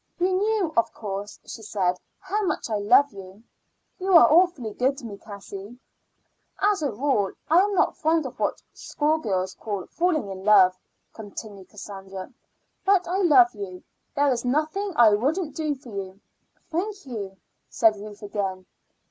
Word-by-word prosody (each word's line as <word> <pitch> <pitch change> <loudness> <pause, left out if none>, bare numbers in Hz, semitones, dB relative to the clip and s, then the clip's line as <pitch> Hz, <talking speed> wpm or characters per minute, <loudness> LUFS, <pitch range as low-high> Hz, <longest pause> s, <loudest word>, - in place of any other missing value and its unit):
"You 370 +1 +1
knew, 405 -4 0
of 230 0 +2
course," 205 -1 -6
she 225 - -8
said, 185 -4 -1 0.2
"how 400 +2 -2
much 230 - -2
I 215 - +1
love 210 +8 +4
you." 195 +2 -12 0.6
"You 380 +1 0
are - - +7
awfully 320 - +3
good 265 +4 0
to 260 - -9
me, 200 -3 -8
Cassie." 200 +1 -10 0.8
"As 405 -3 +2
a 285 -4 0
rule 215 -4 0 0.2
I 335 - +7
am 405 +1 +2
not - - +2
fond 320 -1 +1
of 260 - -8
what - - -1
schoolgirls 220 -12 -1
call 205 -4 -5
falling 335 - 0
in 190 0 -8
love," 190 -3 +6 0.4
continued 205 -3 -9
Cassandra; 195 -1 -9 0.5
"but 380 -3 +3
I 360 +2 -1
love 275 -11 +5
you. 195 -4 -8 0.3
There 285 -1 +3
is 235 -2 -1
nothing 310 +10 -1
I 225 -5 +6
wouldn't 295 - 0
do 305 -2 -1
for 260 -2 -14
you." 195 -2 -6 0.5
"Thank 390 +3 -3
you," 205 -7 -6 0.3
said 220 -1 +3
Ruth 205 0 -10
again. 195 -2 -3
235 Hz, 160 wpm, -25 LUFS, 200-320 Hz, 0.8 s, are